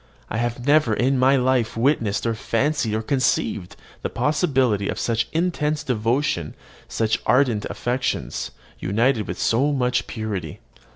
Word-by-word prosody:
I 110 - -1
have 120 +1 -2
never 145 -6 +4
in 130 +3 +1
my 130 +2 +5
life 125 -4 +1
witnessed 115 -5 +1
or 115 - +1
fancied 115 +1 0
or 110 - -2
conceived 125 -7 0 0.3
the - - -2
possibility 130 - +1
of - - -3
such 115 -1 0
intense 155 -3 0
devotion, 115 - -1 0.3
such 110 0 0
ardent 125 -5 +3
affections, 125 +1 -2 0.3
united 110 +4 +1
with - - -5
so 135 +6 +2
much 125 -3 0
purity. 100 -9 -4
120 Hz, 135 wpm, -23 LUFS, 110-135 Hz, 0.3 s, my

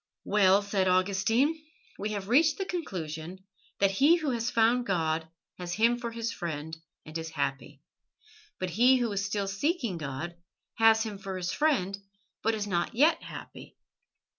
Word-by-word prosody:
"Well," 200 -1 +4
said 200 -2 0
Augustine, 200 - +2 0.4
"we 210 - -2
have 200 -2 -4
reached 300 +7 +4
the 385 - -2
conclusion 180 - -5 0.3
that 195 -1 +3
he 280 - +5
who 310 -5 -1
has 235 0 -1
found 235 +2 +2
God 160 -3 0 0.3
has 175 -1 -4
Him 235 +4 +2
for 235 -1 -4
his 230 0 -3
friend 160 -4 -5 0.3
and 155 - -11
is 165 0 -3
happy; 140 -3 -4 0.7
but 185 -1 -3
he 250 +8 +5
who 240 -3 -1
is 200 -1 -1
still 200 0 -2
seeking 220 - -1
God 155 +3 -5 0.5
has 225 0 +6
Him 210 -3 -6
for 195 -1 -5
his 180 -1 -2
friend 200 -11 +1 0.4
but 225 - +1
is 210 -1 -3
not 175 0 -1
yet 300 +7 +4
happy. - - -10
200 Hz, 165 wpm, -29 LUFS, 180-235 Hz, 0.7 s, has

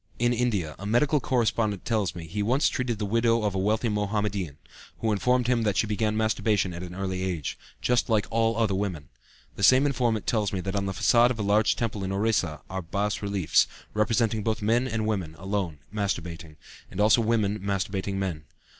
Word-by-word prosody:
In 120 +1 +2
India, 105 -11 -1
a 100 - -7
medical 140 +7 +3
correspondent 115 -6 0
tells 105 -7 0
me, 85 -2 -7
he 100 +6 -3
once 125 +7 +2
treated 125 -3 -2
the 105 - -2
widow 115 +2 +2
of 105 -2 0
a 95 - -1
wealthy 110 +5 +1
Mohammedan, 105 -6 -2 0.4
who 110 - 0
informed 125 +4 +2
him 120 -1 +2
that 105 -2 0
she - - +3
began 110 0 -1
masturbation 110 -4 +1
at 85 - -6
an 90 -1 -7
early 95 -1 -3
age, 90 -6 -3 0.3
"just 125 -1 +2
like 110 -2 +2
all 115 0 +1
other 110 -4 +2
women." 95 -7 -3 0.5
The - - -6
same 130 +8 +6
informant 120 -6 0
tells 105 -4 0
me 95 - -1
that 95 +2 -4
on 100 -1 -1
the - - -1
façade 120 +7 +4
of 125 - -2
a 110 - -2
large 105 +2 +3
temple 105 -4 -2
in 95 - -3
Orissa 100 -6 0
are 95 0 -4
bas 100 +4 -2
reliefs, 100 -5 +2 0.3
representing 110 0 +1
both 110 0 -2
men 120 +4 +2
and 110 -3 -2
women, 95 -8 -2
alone, 95 -4 -3 0.2
masturbating, 85 -6 -3 0.3
and - - -8
also 105 +2 +5
women 110 -2 +1
masturbating 100 0 -2
men. 90 -6 -3
105 Hz, 200 wpm, -26 LUFS, 95-115 Hz, 0.5 s, same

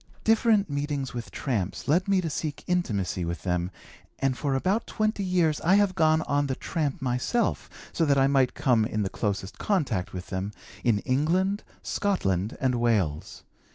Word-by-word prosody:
Different 220 -2 +3
meetings 145 -2 -2
with 120 -1 -5
'tramps' 105 -9 -3
led 175 +7 +2
me 195 -2 +3
to 165 - -2
seek 150 -1 -4
intimacy 100 - -1
with 85 -2 -4
them 90 -1 0 0.5
and 135 -1 +1
for 140 0 -1
about 190 +11 0
twenty 215 -1 -1
years 175 -5 +1
I 180 +4 +4
have 205 -2 +3
gone 160 -3 +3
on 145 -1 +1
the 130 - -1
'tramp' 145 -3 -2
myself 130 - 0 0.2
so 170 - +1
that 140 -2 +3
I 135 - +5
might 135 -2 +2
come 120 -5 +3
in 110 -1 -1
the 95 - -1
closest 100 -2 -3
contact 140 - 0
with 90 -1 -7
them, 95 +2 -3 0.3
in 110 -4 +2
England, 175 +10 +1 0.2
Scotland, 100 - 0
and 125 -2 +1
Wales. 100 -11 0
140 Hz, 170 wpm, -27 LUFS, 110-180 Hz, 0.5 s, I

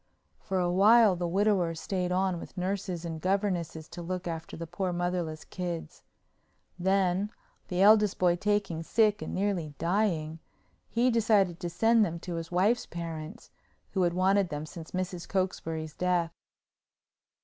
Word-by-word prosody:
For 190 -2 -3
a 175 -1 +1
while 210 +2 +6
the 175 0 -2
widower 185 -2 +2
stayed 180 +2 -2
on 185 -1 +1
with - - -11
nurses 185 -2 -2
and 160 -2 -5
governesses 180 -4 -1
to 175 - -8
look 180 +1 -4
after 165 0 -5
the 165 - -5
poor 180 +3 -3
motherless 175 -3 -2
kids. 175 -3 -5 0.8
Then, 190 +1 +1 0.4
the 180 +1 +1
eldest 210 -1 +5
boy 175 -1 +3
taking 205 -4 0
sick 210 +4 +2
and - - -4
nearly 185 -7 -1
dying, 165 -3 0 0.5
he 245 +2 +2
decided 205 -6 +2
to 175 - -3
send 225 +6 +4
them 170 -4 -2
to 180 - -5
his 165 0 -6
wife's 200 +7 +2
parents, 165 +4 -7 0.4
who 190 - 0
had 175 -1 +2
wanted 190 0 +3
them 150 +1 -4
since 160 0 -9
Mrs. 185 -1 -4
Cokesbury's 165 -5 -2
death. 175 -2 0
180 Hz, 150 wpm, -29 LUFS, 170-200 Hz, 0.8 s, while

